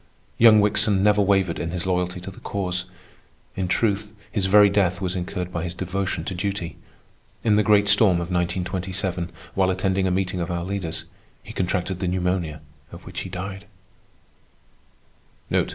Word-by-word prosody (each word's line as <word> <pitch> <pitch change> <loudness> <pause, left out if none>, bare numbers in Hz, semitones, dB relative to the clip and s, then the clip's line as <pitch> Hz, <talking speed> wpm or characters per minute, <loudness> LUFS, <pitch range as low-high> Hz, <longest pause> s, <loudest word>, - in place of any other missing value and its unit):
Young 115 -2 +8
Wickson 100 -1 +2
never 105 0 +4
wavered 95 -3 +2
in 80 - -3
his 90 +1 -3
loyalty 90 0 -1
to 95 - -7
the - - -14
Cause. 90 -2 -2 0.7
In 95 -1 -1
truth, 105 +2 0 0.2
his 100 -4 0
very 105 +1 +7
death 100 -2 +1
was 95 -1 -2
incurred 90 0 -4
by 85 - -2
his 90 0 -4
devotion 95 +2 -2
to 95 - -4
duty. 95 -1 -3 0.7
In 110 -2 +4
the 105 - +4
great 105 -1 +4
storm 105 -2 +5
of 85 +1 -3
1927, 90 0 -2 0.2
while 95 -1 +2
attending 95 0 +1
a - - +1
meeting 90 0 -1
of 85 - -3
our 85 -1 -2
leaders, 95 -3 -4 0.4
he - - -10
contracted 90 0 -1
the 95 - -1
pneumonia 90 -4 -1 0.3
of - - -11
which - - -6
he - - -5
died. 95 +2 -6
95 Hz, 165 wpm, -24 LUFS, 90-100 Hz, 0.7 s, Young